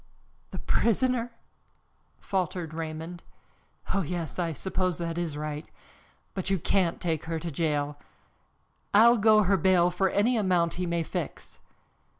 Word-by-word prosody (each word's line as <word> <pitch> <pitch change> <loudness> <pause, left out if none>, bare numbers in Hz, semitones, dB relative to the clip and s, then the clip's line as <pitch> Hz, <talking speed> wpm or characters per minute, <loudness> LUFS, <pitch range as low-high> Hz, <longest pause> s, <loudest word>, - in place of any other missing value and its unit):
"The - - -7
prisoner!" 240 +1 +1 0.9
faltered 180 -4 -2
Raymond. 160 +2 -5 0.7
"Oh, 195 - +2
yes, 170 0 -4
I 170 -2 0
suppose 185 +2 -1
that 170 0 -3
is 160 -4 -3
right. 150 0 -5 0.6
But 190 -1 -3
you 195 - +2
can't 175 0 +1
take 165 -3 -2
her 165 0 -2
to 170 +1 -5
jail. 145 -1 -1 1.0
I'll 235 +3 +7
go 215 0 +5
her 195 +1 +3
ball 180 -2 +4
for 190 +2 +1
any 230 +6 +2
amount 180 -5 +2
he 180 - -1
may 170 -1 0
fix." - - -5
175 Hz, 140 wpm, -28 LUFS, 165-195 Hz, 1.0 s, I'll